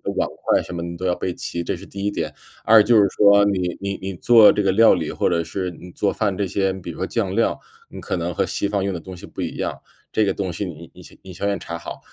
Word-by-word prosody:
碗 - - 0
筷 - - +2
什 - - -9
么 85 - -4
你 85 0 -5
都 90 +2 -5
要 90 - +2
备 90 0 -3
齐， 85 - -5
这 - - -2
是 95 +3 -11
第 100 0 -6
一 - - +2
点。 80 -6 -3 0.3
二 110 -1 +7
就 120 +2 +3
是 100 - +5
说， 100 0 +5
你 90 -3 0
你 100 0 -3
你 95 0 -4
做 110 +4 +6
这 105 - 0
个 95 - +3
料 110 +4 +6
理， 80 -4 -2
或 - - 0
者 85 -1 +1
是 95 +1 -3
你 90 +1 -12
做 100 - -1
饭 100 -4 -1
这 100 - -1
些， 95 +1 0
比 95 -2 -7
如 - - -11
说 95 - -2
酱 100 -3 -2
料， 115 - +1 0.3
你 - - -9
可 - - -3
能 85 0 -2
和 - - 0
西 100 - -2
方 100 -1 0
用 100 - -1
的 85 - -5
东 95 +2 -9
西 - - -10
不 - - -8
一 - - -4
样， - - -3 0.4
这 110 - +3
个 100 - +1
东 95 -2 -3
西 100 - -4
你 85 -1 -9
你 - - -14 0.2
你 95 - -10
先 100 +3 -2
要 100 - 0
查 85 -1 -6
好。 85 - -8
95 Hz, 310 characters per minute, -22 LUFS, 85-100 Hz, 0.4 s, 二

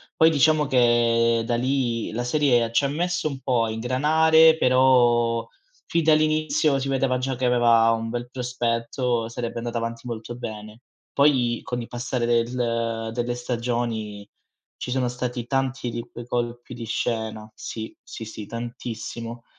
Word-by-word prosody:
Poi 160 - +6
diciamo 155 0 +3
che, 115 -2 +3
da 120 - 0
lì, 120 -2 -1
la 120 +3 -3
serie 120 -3 +2
c'ha 140 +4 +2
messo 175 +3 -1
un 135 -2 -6
po' 125 -3 +1
a - - -3
ingranare, 160 +7 +4
però 120 -3 +3 0.4
fin 170 0 0
dall'inizio 155 -1 +2
si 135 - -3
vedeva 135 -1 +1
già 130 +1 -2
che 125 +1 -2
aveva 120 -2 +4
un 115 0 -2
bel 120 +1 -4
prospetto, 120 -1 -2
sarebbe 115 0 -4
andata 120 0 -4
avanti 115 +1 -4
molto 115 0 -6
bene. 110 -1 -8 0.3
Poi, 130 -5 +3
con 125 -3 -4
il 115 - -7
passare 120 0 -3
del 115 -1 -1
delle 120 0 -2
stagioni, 115 -4 -3 0.5
ci 125 - -5
sono 130 -1 0
stati 125 -1 -4
tanti 135 -1 -1
di 115 0 -4
quei 120 - -8
colpi 120 0 -3
di 115 -1 -7
scena. 110 -1 -3
Sì, 110 0 -7
sì, 115 - -8
sì, 105 -1 -8
tantissimo. 115 0 -6
120 Hz, 150 wpm, -24 LUFS, 115-130 Hz, 0.5 s, Poi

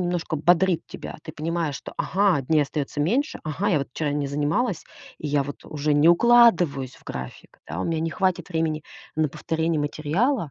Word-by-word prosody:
немножко 175 -2 -1
бодрит 175 +2 +3
тебя. - - -8
Ты 155 - -8
понимаешь, 160 -2 -2
что: - - -9
"Ага, 190 -5 +2
дней 150 +3 +3
остаётся 145 0 -3
меньше. 255 - 0
Ага, 165 +6 -1
я 175 -7 +3
вот 140 - -4
вчера 150 0 -1
не 145 -1 -1
занималась, 150 - -1 0.3
и - - -5
я 145 -1 +2
вот 145 +1 -8
уже 150 0 -1
не 145 +3 +5
укладываюсь 175 - +4
в - - -22
график. 65 -1 -8
Да, 80 +4 -4
у - - -1
меня 165 -1 -1
не 165 0 -1
хватит 190 0 0
времени 160 -3 -1 0.3
на 155 -1 +2
повторение 160 +2 -1
материала". 160 - 0
160 Hz, 190 wpm, -24 LUFS, 145-175 Hz, 0.3 s, не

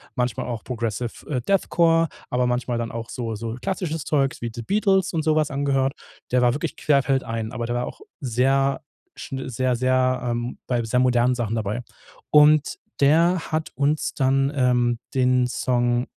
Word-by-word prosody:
manchmal 125 -3 -1
auch 120 -3 -5
progressive, 115 -1 -4
äh, 130 -5 -1
Death 195 +9 +1
Core, 165 -1 +3 0.2
aber 125 0 +1
manchmal 125 0 -1
dann 115 -1 -3
auch 115 0 -6
so 115 -2 -4
so 115 +1 -5
klassisches 165 -3 -3
Zeugs 135 -3 0
wie 115 -1 -3
„The 120 - -6
Beatles“ 195 - +1
und 160 -2 0
so 155 0 +2
was 155 -1 +2
angehört. 135 -1 0 0.4
Der 125 0 +3
war 120 -1 +4
wirklich 145 - -4
querfeldein, 130 -6 0
aber 120 -2 -4
der 120 +1 -2
war 120 0 -1
auch - - -10 0.2
sehr, 135 +1 +1 0.3
sch - - -9
sehr, 130 0 0
sehr 130 +1 +1
ähm, 120 0 -3
bei 120 -2 0
sehr 115 +3 0
modernen 125 0 +3
Sachen 115 -3 -2
dabei. 110 +1 -2 0.5
Und 150 0 +5 0.2
der 165 +6 +4
hat 155 0 -2
uns 145 +3 0
dann, 135 0 +2
ähm, 125 -3 +2 0.2
den 125 -1 +3
Song 120 -1 0
125 Hz, 175 wpm, -23 LUFS, 120-140 Hz, 0.5 s, Und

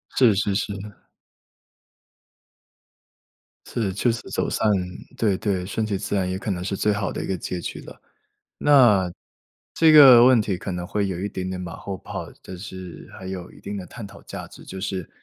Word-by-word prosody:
是 120 -5 +6
是 100 0 0
是。 100 0 -1 2.9
是， 105 -5 -2
确 115 +5 +2
实 115 - -4
走 - - -1
散 110 - +1 0.5
对 100 -5 +2
对， 95 -4 -1
顺 110 +3 -2
其 100 -2 -1
自 100 +1 -3
然 95 -2 0
也 95 - -2
可 105 - -3
能 90 -2 -3
是 100 +1 -2
最 105 +2 +2
好 105 -1 -2
的 - - -4
一 - - -5
个 95 - -1
结 90 +2 -4
局 - - -6
了。 - - -13 0.6
那 115 -11 +5 0.6
这 160 -1 +5
个 135 -6 +10
问 125 -3 +6
题 100 -3 -2
可 95 - -5
能 90 0 -4
会 100 -1 -1
有 90 -2 -4
一 100 - -2
点 95 -1 -4
点 95 - -4
马 90 -2 -6
后 100 -1 -6
炮， - - -7
但 95 - -9
是 95 -2 -9
还 95 - -10
有 95 -2 -6
一 - - -16
定 100 +1 -6
的 95 - -6
探 115 +2 -9
讨 - - -14
价 - - -8
值， - - -14
就 95 - -7
是 95 -3 -4
100 Hz, 215 characters per minute, -23 LUFS, 95-110 Hz, 2.9 s, 个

